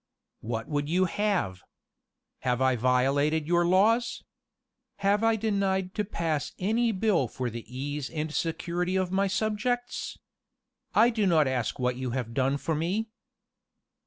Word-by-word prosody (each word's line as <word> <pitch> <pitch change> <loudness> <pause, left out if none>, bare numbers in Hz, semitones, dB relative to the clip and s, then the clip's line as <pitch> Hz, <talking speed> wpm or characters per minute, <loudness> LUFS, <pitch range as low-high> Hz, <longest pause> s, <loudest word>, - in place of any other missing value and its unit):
[*] - - -57
"What 115 -1 -3
would 145 -1 -2
you 185 +3 +3
have? 180 - -1 0.8
Have 125 -1 0
I 130 -1 +3
violated 135 +6 +2
your 175 +1 +2
laws? 220 +6 +3 0.8
Have 205 +2 +3
I 225 0 +4
denied 195 -3 0
to 210 - -1
pass 165 -7 -2
any 225 +5 +1
bill 195 - +1
for 125 +1 -4
the 115 0 -6
ease 140 +2 -4
and 155 -1 -4
security 175 +3 -1
of 185 -1 0
my 195 +1 +2
subjects? 220 +5 -2 0.8
I 235 +3 +6
do 215 -4 +1
not 160 -5 +4
ask 130 -4 -1
what 125 -1 0
you 130 -1 -3
have 115 -2 -4
done 135 +2 +1
for 160 - -2
me. 185 +9 -1
170 Hz, 150 wpm, -28 LUFS, 135-205 Hz, 0.8 s, I